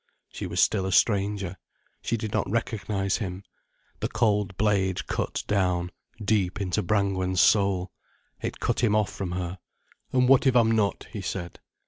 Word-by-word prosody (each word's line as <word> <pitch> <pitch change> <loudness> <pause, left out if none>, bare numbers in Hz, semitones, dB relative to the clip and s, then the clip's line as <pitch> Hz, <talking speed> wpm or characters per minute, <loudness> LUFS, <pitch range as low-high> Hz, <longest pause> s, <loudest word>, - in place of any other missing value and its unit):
She - - -6
was - - -3
still 95 -1 +3
a - - -2
stranger. 100 -2 +1 0.4
She 115 - -1
did 110 -1 -5
not - - 0
recognize 105 -3 -1
him. 95 -3 -5 0.6
The - - -1
cold 105 -4 0
blade 100 -3 +1
cut - - -2
down, 90 -3 0 0.3
deep 100 -2 0
into 100 +1 0
Brangwen's 95 -2 0
soul. 95 0 +3 0.5
It - - -4
cut - - 0
him 105 -3 +3
off 105 -2 +1
from 90 -3 -4
her. 90 0 -4 0.5
"And 125 -1 +3
what 135 +1 +5
if 130 - +3
I'm 115 -2 +5
not?" 105 -3 +1
he 105 - -5
said. 90 -2 -5
100 Hz, 160 wpm, -26 LUFS, 95-110 Hz, 0.6 s, what